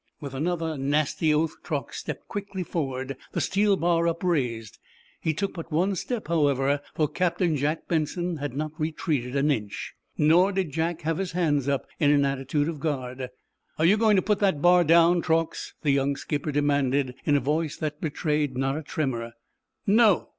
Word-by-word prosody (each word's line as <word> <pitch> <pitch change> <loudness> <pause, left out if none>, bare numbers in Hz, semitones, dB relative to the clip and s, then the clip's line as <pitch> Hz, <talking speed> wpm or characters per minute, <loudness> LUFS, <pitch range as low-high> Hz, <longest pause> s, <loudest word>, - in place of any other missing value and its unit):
With 140 -4 -7
another 160 +1 -2
nasty 150 +3 +1
oath 155 +1 +1
Truax 145 -4 -4
stepped 150 -4 -6
quickly 200 -2 -4
forward, 135 -5 -3 0.2
the - - -1
steel 200 0 +2
bar 170 -1 +2
upraised. 140 - -1 0.4
He 160 - 0
took 195 +6 -2
but 165 -1 -8
one 180 +6 +2
step, 230 +5 -4
however, 145 -3 +2
for 155 - +2
Captain 170 +1 0
Jack 150 +3 -1
Benson 170 +2 -1
had 145 -3 -4
not 155 0 -2
retreated 150 -5 -2
an 140 +2 +3
inch. 105 -6 -3 0.2
Nor 175 +6 +4
did 185 -5 -1
Jack 165 +2 -1
have 160 +2 -1
his 190 -3 -3
hands 145 -6 +1
up 140 -2 0
in 145 - +4
an 145 -1 +4
attitude 140 +2 -1
of 165 -3 -4
guard. 130 -4 -3 0.5
"Are 160 - +2
you 190 +5 +6
going 215 -1 +4
to 185 - +3
put 210 -1 +1
that 190 -7 +2
bar 175 +3 +5
down, 170 +2 +5
Truax?" 165 -1 -1
the 145 - +3
young 140 0 +1
skipper 150 +2 -3
demanded, 140 -2 +1
in 145 - +2
a - - +4
voice 150 +3 -1
that 150 -1 -4
betrayed 150 -3 -1
not 135 +1 0
a 155 - -3
tremor. 125 -6 -3 0.5
"No." 210 -2 +4
155 Hz, 180 wpm, -26 LUFS, 140-170 Hz, 0.5 s, you